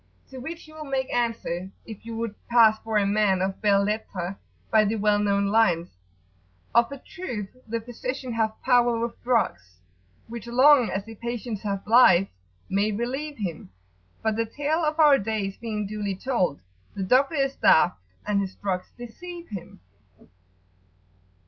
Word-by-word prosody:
To 260 - -8
which 325 +5 -8
you 310 - -15
will 310 -1 -8
make 270 -1 -2
answer, 225 -7 -2 0.2
if 225 0 -10
you 230 - -5
would 230 -2 -3
pass 225 -2 +5
for 220 -1 -1
a 205 - +3
man 200 -2 +2
of 190 +1 -2
belles 200 -2 +3
lettres, 195 -4 -3 0.4
by 220 -1 +5
the 215 +2 0
well 210 -1 +2
known 200 -1 +1
lines, 180 -6 +2 0.8
"Of 235 +2 +4
a 280 - -6
truth, 250 - -7
the 230 +1 -2
physician 250 +2 -5
hath 220 -1 -1
power 245 -2 +4
with 235 0 -4
drugs, 105 - -1 0.5
Which, 235 0 -8
long 255 +1 +5
as 195 +1 -3
the 225 - -9
patient 235 -1 -5
hath 200 -1 -4
life, 205 -5 +6 0.4
may 200 +2 +1
relieve 265 +7 -3
him; 170 - -5 0.5
But 220 -1 0
the 230 0 0
tale 295 +7 -1
of 305 +1 -1
our 295 -3 +7
days 200 -2 -3
being 215 -3 -3
duly 205 -1 -3
told, 185 - -1 0.3
The 195 - -3
doctor 265 - +3
is 275 -1 0
daft, 175 +3 +4 0.3
and 205 -1 +1
his 190 -1 -5
drugs 185 -2 -3
deceive 345 +9 -9
him." 190 - -9
225 Hz, 160 wpm, -25 LUFS, 200-250 Hz, 0.8 s, our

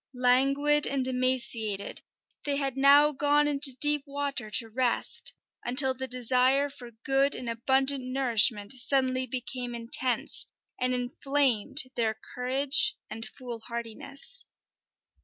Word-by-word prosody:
Languid 275 +4 +2
and 270 -2 -2
emaciated, 250 -5 -2 0.4
they 285 -1 -1
had 275 -2 -2
now 285 +2 +5
gone 290 +1 +1
into 280 -2 +2
deep 295 0 +1
water 280 -5 -4
to 230 +2 +1
rest, 240 +2 -2 0.3
until 260 +2 +3
the 260 +1 -6
desire 255 +3 +1
for 245 -3 -11 0.2
good 270 +1 +2
and 250 - -7
abundant 265 +3 +2
nourishment 235 -4 +1
suddenly 260 0 +1
became 245 0 -5
intense, 235 +2 +2 0.3
and 255 0 0
inflamed 270 0 +1
their 220 -2 -2
courage 275 +11 +4 0.2
and 225 0 -5
foolhardiness. 235 - -5
260 Hz, 115 wpm, -27 LUFS, 245-280 Hz, 0.4 s, now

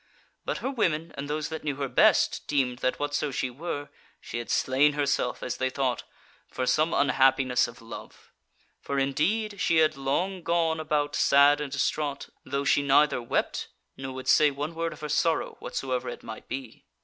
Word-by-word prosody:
But - - -2
her 265 - 0
women 165 - 0
and 140 +1 -6
those 150 0 -2
that 160 0 -6
knew 145 -2 -2
her 140 0 -2
best, - - +3
deemed 130 -4 0
that 130 - 0
whatso 145 0 -1
she 130 -2 -2
were, 145 +1 -5 0.3
she 120 - -6
had 120 - -7
slain 140 +3 +3
herself, 140 -4 -1
as 125 - -3
they 130 - 0
thought, 130 -1 -1 0.4
for 130 - -3
some 155 +5 +2
unhappiness 130 -2 +3
of 115 - -13
love. 115 - -11 0.5
For 140 - -3
indeed 190 +10 0
she 165 - +2
had 155 -1 +4
long 175 +8 -1
gone 165 -1 +1
about 150 -2 -1
sad 140 +1 +5
and 145 -2 -4
distraught, 140 +1 -2
though 140 +1 -3
she 145 - +4
neither 140 -1 +3
wept, 115 - -1 0.3
nor 130 0 -6
would 130 - -7
say 150 -1 +6
one 145 +3 -4
word 165 0 -2
of - - -14
her 150 - -3
sorrow, 160 +2 0
whatsoever 130 -2 -3
it - - -8
might 110 - -9
be. 130 -3 -7
145 Hz, 185 wpm, -27 LUFS, 130-155 Hz, 0.5 s, say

